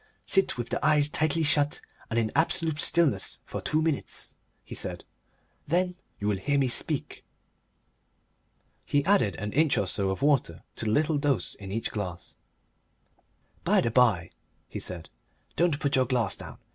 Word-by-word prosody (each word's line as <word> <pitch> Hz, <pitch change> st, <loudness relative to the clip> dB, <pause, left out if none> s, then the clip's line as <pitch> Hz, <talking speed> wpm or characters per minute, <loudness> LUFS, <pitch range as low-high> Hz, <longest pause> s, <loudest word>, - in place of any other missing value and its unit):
"Sit 195 Hz, -8 st, +2 dB
with 120 Hz, -1 st, -4 dB
the -, -, -2 dB
eyes 150 Hz, -1 st, +4 dB
tightly 155 Hz, +1 st, +1 dB
shut 150 Hz, -1 st, +3 dB, 0.3 s
and 115 Hz, -, -2 dB
in 110 Hz, -2 st, +1 dB
absolute 160 Hz, -1 st, +1 dB
stillness 170 Hz, -5 st, +1 dB
for -, -, -5 dB
two 155 Hz, +1 st, +1 dB
minutes," 160 Hz, -3 st, -2 dB, 0.3 s
he -, -, -10 dB
said. -, -, -3 dB, 0.6 s
"Then 180 Hz, +4 st, +1 dB, 0.3 s
you 100 Hz, -, -2 dB
will 105 Hz, -2 st, +1 dB
hear 145 Hz, +6 st, 0 dB
me 135 Hz, -2 st, +2 dB
speak." -, -, 0 dB, 1.6 s
He 145 Hz, 0 st, 0 dB
added 170 Hz, -, +3 dB
an 100 Hz, +3 st, -5 dB
inch 155 Hz, 0 st, +3 dB
or 100 Hz, -, +1 dB
so 95 Hz, +1 st, 0 dB
of 95 Hz, +8 st, -3 dB
water 145 Hz, -2 st, +1 dB
to -, -, -4 dB
the 105 Hz, -, +1 dB
little 150 Hz, +4 st, +2 dB
dose 140 Hz, -, 0 dB
in 95 Hz, -1 st, -9 dB
each 115 Hz, +3 st, -2 dB
glass. 90 Hz, -5 st, -5 dB, 1.3 s
"By -, -, +3 dB
the 115 Hz, -, 0 dB
by," 110 Hz, -9 st, +3 dB, 0.4 s
he -, -, -6 dB
said, 85 Hz, -5 st, -6 dB, 0.4 s
"don't 165 Hz, -4 st, +2 dB
put 140 Hz, -2 st, 0 dB
your 130 Hz, -1 st, +3 dB
glass 120 Hz, -5 st, 0 dB
down. -, -, -10 dB
140 Hz, 165 wpm, -27 LUFS, 105-155 Hz, 1.6 s, eyes